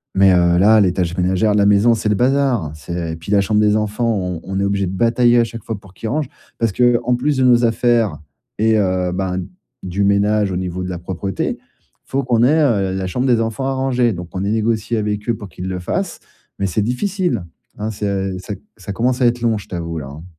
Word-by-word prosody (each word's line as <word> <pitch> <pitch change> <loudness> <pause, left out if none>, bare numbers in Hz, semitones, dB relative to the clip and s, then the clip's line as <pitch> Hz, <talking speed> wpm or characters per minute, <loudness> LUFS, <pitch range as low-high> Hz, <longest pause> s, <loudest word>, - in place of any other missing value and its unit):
Mais, 95 0 +6
heu, 85 -1 +3
là 105 +3 +6
les 90 -3 +3
tâches 90 -2 -2
ménagère 95 +4 +2
de 105 - +2
la 100 - +4
maison, 105 +3 +5
c'est 105 -1 -1
le 105 - +2
bazar, 125 - +1
c'est 85 +2 -5
et - - -4
puis 80 +5 -8
la 100 -1 +4
chambre 105 +2 +1
des 105 0 +3
enfants, 110 +2 0
on 90 -5 -2
on 95 0 -3
est - - +1
obligé 100 -1 0
de - - -3
batailler 120 +4 +3
à - - +5
chaque 115 0 -7
fois 110 -3 -5
pour 95 -2 -17
qu'ils 110 +3 -5
rangent. 145 0 -1 0.3
Parce 115 -3 0
qu'en 120 +2 +2
plus 140 +3 0
de 130 - +2
nos 120 -1 +5
affaires 115 -6 +2 0.4
et 110 +1 +3
heu, 95 -2 0
ben, 90 -1 -2 0.4
du 95 +2 -1
ménage 100 0 +2
au 90 - -2
niveau 90 0 -3
de 90 - -4
la 90 - -4
propreté, 95 +2 -3
il - - -35 0.4
faut 135 +1 -1
qu'on 120 -2 +2
ait, 155 +5 +4
heu, 100 -10 +1
la 95 -1 -2
chambre 125 +8 -1
des 120 -2 +3
enfants 115 +3 -2
à 135 - 0
ranger. 125 -2 +1
Donc 90 0 -7
on 95 - -3
a 100 +2 -1
négocié 110 +1 0
avec 105 +1 -2
eux 115 - +2
pour 105 - -8
qu'ils 90 +1 -7
le 90 -1 -3
fassent, 90 - -3 0.4
mais 100 - -1
c'est 95 +3 0
difficile, 175 - -1 0.3
hein 110 +1 -3
c'est 105 0 -3
à 95 -1 -1
ça 95 +3 -6
c 95 - -17 0.2
ça 100 +1 -7
commence 125 +3 0
à 120 - +5
être 120 0 0
long, 115 -2 +1
je - - -12
t'avoue 85 -2 -4
là 70 - -7
hein. 75 +4 -10
105 Hz, 250 wpm, -19 LUFS, 95-120 Hz, 0.4 s, Mais